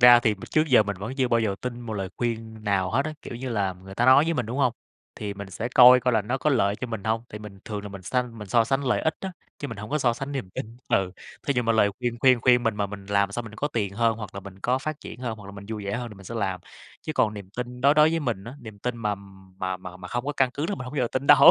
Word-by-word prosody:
ra 120 Hz, 0 st, +9 dB
thì 110 Hz, -3 st, +2 dB
m 100 Hz, -, -18 dB
trước 155 Hz, 0 st, +4 dB
giờ 125 Hz, -5 st, +7 dB
mình 100 Hz, -2 st, -4 dB
vẫn 105 Hz, +6 st, -5 dB
chưa 130 Hz, -3 st, +2 dB
bao 115 Hz, -1 st, +3 dB
giờ 105 Hz, -3 st, 0 dB
tin 120 Hz, -1 st, -4 dB
một 115 Hz, -2 st, -6 dB
lời 95 Hz, -2 st, -3 dB
khuyên 110 Hz, -2 st, -3 dB
nào 95 Hz, -3 st, +1 dB
hết 135 Hz, +5 st, +2 dB
á, 155 Hz, -, -3 dB
kiểu -, -, -7 dB
như 130 Hz, +2 st, -5 dB
là, 100 Hz, -5 st, 0 dB
người 95 Hz, +1 st, -12 dB
ta 120 Hz, +4 st, +2 dB
nói 130 Hz, +4 st, +8 dB
với 165 Hz, -, 0 dB
mình, 125 Hz, -7 st, -1 dB
đúng 125 Hz, +4 st, -4 dB
hông? 125 Hz, -4 st, +3 dB, 0.4 s
Thì 105 Hz, -1 st, -5 dB
mình 100 Hz, -1 st, -8 dB
sẽ 110 Hz, +5 st, -3 dB
coi 125 Hz, 0 st, +9 dB
coi 125 Hz, 0 st, +1 dB
là 110 Hz, -2 st, +3 dB
nó 125 Hz, +6 st, -2 dB
có 150 Hz, -, +2 dB
lợi 105 Hz, -7 st, +2 dB
cho 120 Hz, -, -4 dB
mình 110 Hz, -4 st, -5 dB
hông. 110 Hz, +1 st, 0 dB
Thì 105 Hz, -, -7 dB
mình 105 Hz, -2 st, -10 dB
thường 105 Hz, -2 st, -4 dB
là 105 Hz, -, -6 dB
mình 100 Hz, -1 st, -9 dB
sanh 125 Hz, +2 st, -2 dB
mình 105 Hz, -, -8 dB
so 115 Hz, +3 st, +4 dB
sánh 135 Hz, +4 st, 0 dB
lợi 125 Hz, -, +2 dB
ích 160 Hz, -, +1 dB
á, 190 Hz, -1 st, -4 dB, 0.3 s
chứ 145 Hz, -, -4 dB
mình 115 Hz, -, -6 dB
hổng 105 Hz, +1 st, -7 dB
có 150 Hz, -, +1 dB
so 125 Hz, -4 st, +3 dB
sánh 135 Hz, +4 st, -5 dB
niềm 130 Hz, -10 st, -4 dB
tin, 110 Hz, +5 st, -6 dB
ừ. 95 Hz, -1 st, +2 dB, 0.4 s
Thí 140 Hz, -, +2 dB
dụ 125 Hz, -, +3 dB
mà 115 Hz, -1 st, +2 dB
lời 105 Hz, -2 st, +4 dB
khuyên 120 Hz, -1 st, -2 dB
khuyên 130 Hz, -2 st, +5 dB
khuyên 125 Hz, 0 st, +5 dB
mình 115 Hz, -3 st, 0 dB
mà 100 Hz, -1 st, 0 dB
mình 100 Hz, -1 st, -9 dB
làm 100 Hz, 0 st, +2 dB
xong 120 Hz, +2 st, -3 dB
mình 110 Hz, -, -10 dB
có 145 Hz, +7 st, -1 dB
tiền 105 Hz, -8 st, -1 dB
hơn, 115 Hz, 0 st, +2 dB
hoặc 105 Hz, -4 st, -7 dB
là 100 Hz, -, -5 dB
mình 95 Hz, -1 st, -11 dB
có 125 Hz, +2 st, +1 dB
phát 155 Hz, +2 st, -4 dB
triển -, -, -9 dB
hơn, 115 Hz, -3 st, -3 dB
hoặc 100 Hz, -, -11 dB
là -, -, -8 dB
mình 100 Hz, 0 st, -10 dB
vui 110 Hz, -2 st, -4 dB
vẻ 100 Hz, +1 st, -1 dB
hơn 120 Hz, 0 st, -4 dB
thì 110 Hz, -, -11 dB
mình 95 Hz, -1 st, -14 dB
sẽ 115 Hz, -, -7 dB
làm. 95 Hz, -5 st, -1 dB, 0.4 s
Chứ 155 Hz, -, -3 dB
còn 110 Hz, -7 st, +2 dB
niềm 100 Hz, -2 st, -9 dB
tin 125 Hz, +2 st, -6 dB
đối 140 Hz, +3 st, +5 dB
đối 150 Hz, +1 st, +6 dB
với 165 Hz, 0 st, 0 dB
mình 115 Hz, -9 st, -2 dB
á, 120 Hz, -, -8 dB
niềm 110 Hz, -2 st, -10 dB
tin 125 Hz, +3 st, -3 dB
mà 105 Hz, -3 st, -1 dB, 0.4 s
mà 95 Hz, 0 st, -2 dB
mà 90 Hz, -1 st, -9 dB
mà 90 Hz, 0 st, -9 dB
không 120 Hz, +1 st, -2 dB
có 145 Hz, -, 0 dB
căn 130 Hz, -2 st, +3 dB
cứ 150 Hz, +3 st, -1 dB
là 205 Hz, -, -1 dB
mình 125 Hz, -, -7 dB
hổng 125 Hz, -, -7 dB
bao -, -, -2 dB
giờ 120 Hz, -, -1 dB
tin 130 Hz, +1 st, -1 dB
đâu. 140 Hz, -1 st, +10 dB
115 Hz, 330 wpm, -26 LUFS, 100-125 Hz, 0.4 s, đâu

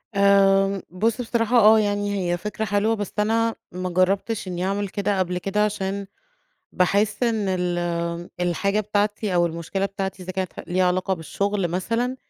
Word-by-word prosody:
آآ، 195 Hz, -1 st, +4 dB
بُصّ 220 Hz, +7 st, 0 dB
بصراحة 235 Hz, 0 st, +1 dB
آه، 220 Hz, 0 st, +7 dB
يعني 205 Hz, -1 st, 0 dB, 0.2 s
هي 175 Hz, -, +1 dB
فكرة 210 Hz, +4 st, -4 dB
حلوة، 215 Hz, +2 st, +1 dB
بس 205 Hz, -3 st, -5 dB
أنا 225 Hz, +2 st, +1 dB, 0.2 s
ما 185 Hz, +1 st, -4 dB
جربتش 195 Hz, +4 st, 0 dB
إني 180 Hz, 0 st, -3 dB
أعمل 200 Hz, +1 st, -1 dB
كده 200 Hz, 0 st, -1 dB
قبل 180 Hz, -1 st, 0 dB
كده، 200 Hz, +3 st, 0 dB
عشان 200 Hz, -1 st, -3 dB, 0.6 s
باحس 205 Hz, +5 st, +1 dB
إن 225 Hz, -3 st, +1 dB
ال 180 Hz, -1 st, -1 dB, 0.6 s
الحاجة 190 Hz, +4 st, +1 dB
بتاعتي 210 Hz, -1 st, -1 dB
أو 175 Hz, 0 st, +4 dB
المشكلة 170 Hz, +4 st, -2 dB
بتاعتي 195 Hz, -1 st, -4 dB
إذا 185 Hz, -, -5 dB
كانت 185 Hz, -1 st, -3 dB
ح -, -, -10 dB
ليها 185 Hz, +1 st, +2 dB
علاقة 185 Hz, +1 st, 0 dB
بالشغل 195 Hz, +3 st, -2 dB
مثلًا، 230 Hz, +9 st, -1 dB
200 Hz, 160 wpm, -23 LUFS, 185-210 Hz, 0.6 s, آه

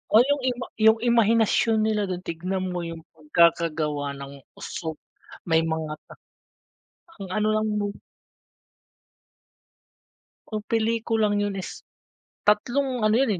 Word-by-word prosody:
O 230 Hz, -, +9 dB
yung 285 Hz, -1 st, +1 dB
ima 250 Hz, 0 st, -4 dB
yung 220 Hz, +1 st, +5 dB
imahinasyon 230 Hz, -1 st, +3 dB
nila 215 Hz, -2 st, +1 dB
dun 180 Hz, -1 st, -4 dB
tignan 185 Hz, +2 st, -3 dB
mo 180 Hz, -, -3 dB
yung 165 Hz, -1 st, -7 dB
pagkakagawa 155 Hz, -2 st, +1 dB
ng 140 Hz, 0 st, -9 dB, 0.2 s
usok 160 Hz, -2 st, -5 dB, 0.5 s
may 160 Hz, -2 st, +3 dB
mga 160 Hz, -1 st, -2 dB, 1.3 s
ang 190 Hz, -, -6 dB
ano 215 Hz, +2 st, +1 dB
lang 215 Hz, 0 st, +1 dB
mo 205 Hz, 0 st, -2 dB, 2.5 s
Ang 215 Hz, -1 st, -4 dB
pelikulang 225 Hz, -1 st, +1 dB
yun 200 Hz, -1 st, -2 dB
is 185 Hz, -, -8 dB, 0.6 s
tatlong 250 Hz, +5 st, +1 dB
ano 215 Hz, 0 st, +3 dB
yun, 265 Hz, -3 st, +2 dB
205 Hz, 115 wpm, -25 LUFS, 165-225 Hz, 2.5 s, O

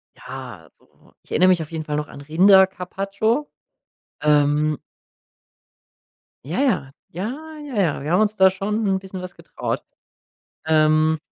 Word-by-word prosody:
Ja, 125 Hz, -, -10 dB
so -, -, -27 dB
Ich -, -, -23 dB
erinnere 185 Hz, +3 st, +4 dB
mich 175 Hz, -3 st, +3 dB
auf 155 Hz, -, -7 dB
jeden 160 Hz, -1 st, -4 dB
Fall 150 Hz, -, -3 dB
noch 150 Hz, 0 st, -2 dB
an 140 Hz, -, -11 dB
Rinder-Carpaccio. 195 Hz, -, +2 dB, 0.7 s
Ähm 150 Hz, 0 st, +2 dB, 1.7 s
Ja, 165 Hz, -, -3 dB
ja. 190 Hz, -, +1 dB, 0.2 s
Ja. 195 Hz, +8 st, -3 dB, 0.3 s
Ja, 275 Hz, -5 st, -7 dB
ja, 160 Hz, -6 st, 0 dB
wir 155 Hz, -, -3 dB
haben 180 Hz, -, +4 dB
uns 215 Hz, 0 st, +1 dB
da 190 Hz, -1 st, +6 dB
schon 210 Hz, +3 st, -2 dB
'n 190 Hz, -1 st, +1 dB
bisschen 190 Hz, -1 st, -8 dB
was 180 Hz, -1 st, -8 dB
getraut. -, -, -4 dB, 0.8 s
Ähm 155 Hz, 0 st, +3 dB
180 Hz, 145 wpm, -22 LUFS, 150-195 Hz, 1.7 s, da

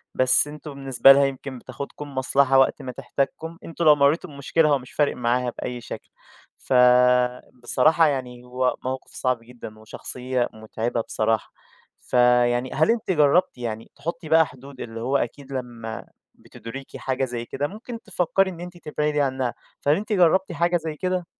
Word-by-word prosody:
بس 130 Hz, +3 st, +3 dB
أنتم 150 Hz, 0 st, -9 dB
بالنسبة 135 Hz, -1 st, +5 dB
لها 140 Hz, 0 st, +6 dB
يمكن 135 Hz, -1 st, -5 dB
بتاخدكم 140 Hz, +3 st, -8 dB
مصلحة 135 Hz, +1 st, +3 dB
وقت 135 Hz, +2 st, +3 dB
ما 130 Hz, -, -5 dB
تحتاجكم، 140 Hz, +5 st, -3 dB
أنتم 165 Hz, 0 st, -3 dB
لو 150 Hz, -1 st, +8 dB
مرّيتوا 145 Hz, +5 st, +2 dB
بمشكلة 150 Hz, +2 st, +1 dB
هو 145 Hz, -2 st, +3 dB
مش 130 Hz, 0 st, -13 dB
فارق 145 Hz, -1 st, +1 dB
معاها 125 Hz, +1 st, 0 dB
بأي 125 Hz, -1 st, -5 dB
شكل، -, -, -9 dB, 0.5 s
فبصراحة 125 Hz, +4 st, +3 dB
يعني 125 Hz, -4 st, -3 dB
هو 125 Hz, 0 st, -1 dB
موقف 130 Hz, 0 st, -5 dB
صعب 130 Hz, -2 st, 0 dB
جدًا، 115 Hz, -3 st, -11 dB
وشخصية 125 Hz, +3 st, -3 dB
مُتعِبة 110 Hz, +2 st, -3 dB
بصراحة، 110 Hz, 0 st, -1 dB, 0.5 s
فيعني 125 Hz, 0 st, +2 dB
هل 155 Hz, +8 st, +3 dB
أنتِ 225 Hz, -5 st, -1 dB
جرّبتِ 150 Hz, -1 st, +3 dB
يعني 115 Hz, -2 st, -5 dB
تحُطّي 165 Hz, +2 st, -6 dB
بقى 160 Hz, 0 st, +6 dB
حدود، 135 Hz, -2 st, -12 dB
اللي 115 Hz, -1 st, -6 dB
هو 130 Hz, +4 st, +1 dB
أكيد 140 Hz, +3 st, -5 dB
لمّا 120 Hz, -3 st, -6 dB, 0.3 s
بتُدركي 135 Hz, +4 st, -10 dB
حاجة 130 Hz, 0 st, -1 dB
زي 120 Hz, -2 st, -5 dB
كده 145 Hz, +4 st, -3 dB
ممكن 225 Hz, +5 st, -9 dB
تفكّري 190 Hz, -1 st, +1 dB
إن 175 Hz, -, -9 dB
أنتِ 180 Hz, 0 st, -9 dB
تبعدي 150 Hz, -2 st, -1 dB
عنّها، 130 Hz, -3 st, -1 dB, 0.3 s
فهل 145 Hz, +1 st, +3 dB
أنتِ 210 Hz, +4 st, -3 dB
جرّبتِ 190 Hz, 0 st, +3 dB
حاجة 170 Hz, +1 st, +1 dB
زي 160 Hz, -2 st, -5 dB
كده؟ 180 Hz, +2 st, -2 dB
135 Hz, 160 wpm, -24 LUFS, 125-155 Hz, 0.5 s, لو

